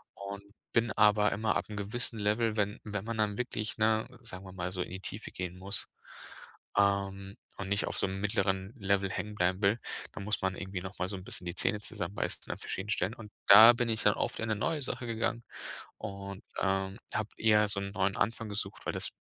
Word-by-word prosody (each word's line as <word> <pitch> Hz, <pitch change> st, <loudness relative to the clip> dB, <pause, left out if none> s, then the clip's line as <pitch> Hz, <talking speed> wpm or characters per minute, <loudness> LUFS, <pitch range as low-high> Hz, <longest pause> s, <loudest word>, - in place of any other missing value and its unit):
Und 100 Hz, 0 st, -7 dB, 0.3 s
bin 115 Hz, -1 st, +3 dB
aber 105 Hz, 0 st, +5 dB
immer 110 Hz, +2 st, 0 dB
ab -, -, -1 dB
'nem 105 Hz, -, -6 dB
gewissen 110 Hz, +3 st, -1 dB
Level 110 Hz, +2 st, +2 dB
wenn 105 Hz, +1 st, +1 dB
wenn 105 Hz, -2 st, -4 dB
man 115 Hz, -1 st, -3 dB
dann 105 Hz, -1 st, +1 dB
wirklich, 115 Hz, -3 st, -2 dB
ne, 110 Hz, 0 st, +3 dB, 0.2 s
sagen 95 Hz, -5 st, -7 dB
wir 95 Hz, -, -9 dB
mal, 90 Hz, 0 st, -3 dB
so 90 Hz, -, -2 dB
in -, -, -3 dB
die 95 Hz, -, -5 dB
Tiefe 105 Hz, +4 st, -5 dB
gehen 90 Hz, -1 st, -5 dB
muss, 100 Hz, +2 st, -2 dB, 0.9 s
ähm, 100 Hz, -1 st, +1 dB, 0.2 s
und 95 Hz, -, -4 dB
nicht 100 Hz, +1 st, +3 dB
auf -, -, -3 dB
so -, -, +4 dB
'nem 95 Hz, 0 st, -4 dB
mittleren 95 Hz, 0 st, 0 dB
Level 100 Hz, -3 st, +1 dB
hängenbleiben 95 Hz, -1 st, -1 dB
will, 100 Hz, +4 st, +4 dB, 0.3 s
dann -, -, -6 dB
muss 105 Hz, +2 st, 0 dB
man 95 Hz, -1 st, 0 dB
irgendwie 95 Hz, -1 st, -5 dB
noch 95 Hz, 0 st, -7 dB
mal 90 Hz, 0 st, 0 dB
so 100 Hz, -, -1 dB
'n 95 Hz, -, -9 dB
bisschen 90 Hz, -, -4 dB
die 85 Hz, 0 st, -3 dB
Zähne 105 Hz, -, +2 dB
zusammenbeißen 100 Hz, -2 st, -3 dB
an -, -, -4 dB
verschiedenen 95 Hz, +2 st, -4 dB
Stellen. 100 Hz, 0 st, +1 dB
Und 105 Hz, -3 st, -11 dB, 0.2 s
da 110 Hz, +4 st, +11 dB
bin 120 Hz, 0 st, 0 dB
dann 105 Hz, -, +5 dB
oft -, -, -2 dB
in 110 Hz, 0 st, -2 dB
'ne 110 Hz, -, +2 dB
neue 150 Hz, +7 st, -1 dB
Sache 130 Hz, -1 st, -2 dB
gegangen 115 Hz, +1 st, -1 dB, 0.6 s
und, 100 Hz, -2 st, -6 dB, 0.2 s
ähm, 95 Hz, 0 st, 0 dB, 0.2 s
habe 110 Hz, -1 st, 0 dB
eher 105 Hz, -1 st, +5 dB
so 100 Hz, -1 st, -1 dB
'n 100 Hz, 0 st, -4 dB
neuen 95 Hz, 0 st, 0 dB
Anfang 115 Hz, +1 st, 0 dB
gesucht, 100 Hz, -1 st, -3 dB
weil -, -, 0 dB
das -, -, 0 dB
100 Hz, 215 wpm, -31 LUFS, 95-110 Hz, 0.9 s, da